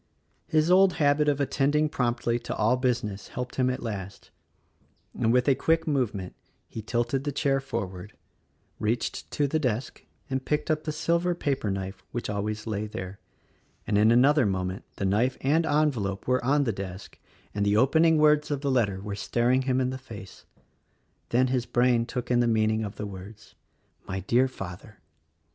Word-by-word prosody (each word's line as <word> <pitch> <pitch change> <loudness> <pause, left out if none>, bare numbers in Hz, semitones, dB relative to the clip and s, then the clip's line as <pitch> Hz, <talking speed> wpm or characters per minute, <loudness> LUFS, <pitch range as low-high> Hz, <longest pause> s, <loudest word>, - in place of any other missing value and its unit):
His 155 +2 +2
old 190 0 +6
habit 150 -1 +3
of 145 -1 0
attending 145 +2 +2
promptly 120 -4 -1
to - - -5
all 110 +3 +3
business 120 -6 -2
helped 125 0 -6
him 130 -1 +2
at 130 - -3
last, 100 -4 -6 0.8
and, 115 - +1
with 125 +2 +3
a 140 - +6
quick 165 +4 +1
movement, 120 - -1 0.3
'he 110 - -7
tilted 120 +4 -1
the 145 - -2
chair 140 -1 +1
forward 100 -6 -5 0.3
— - - -42
reached 110 +2 -2
to 145 - 0
the 155 +3 0
desk 125 -3 -2 0.2
and 130 -1 -2
picked 150 +3 -1
up 155 0 -1
the 155 - -1
silver 170 +3 0
paperknife 100 - -2
which 120 -3 -3
always 105 +1 -3
lay 110 -1 -2
there, 95 -2 -7 0.3
— - - -38
and 105 - -1
in 105 +2 +5
another 130 +1 +5
moment 95 0 -3
the 100 - -3
knife 110 +7 +1
and 155 +5 +2
envelope 130 -10 0
were 125 0 +2
on 140 +3 +3
the 120 - 0
desk 95 0 -8 0.3
and 105 - -1
the 100 +1 +2
opening 160 +7 +4
words 150 0 +4
of 145 -2 -2
the 140 -2 0
letter 105 -7 +1
were 100 0 -5
staring 120 +5 +1
him 130 -1 0
in 130 0 0
the 130 - -5
face. 110 -6 -11 0.8
Then 125 +2 +3
his 125 -2 -1
brain 120 -1 +2
took 125 -1 -4
in 120 - +4
the 120 - +3
mean 110 -1 +2
ing 110 0 -1
of 105 -1 -5
the 105 - -5
words 100 +2 -10 0.5
"My 95 0 -3
Dear 120 +7 +3
Father!" 100 -2 -9
125 Hz, 185 wpm, -27 LUFS, 105-140 Hz, 0.8 s, old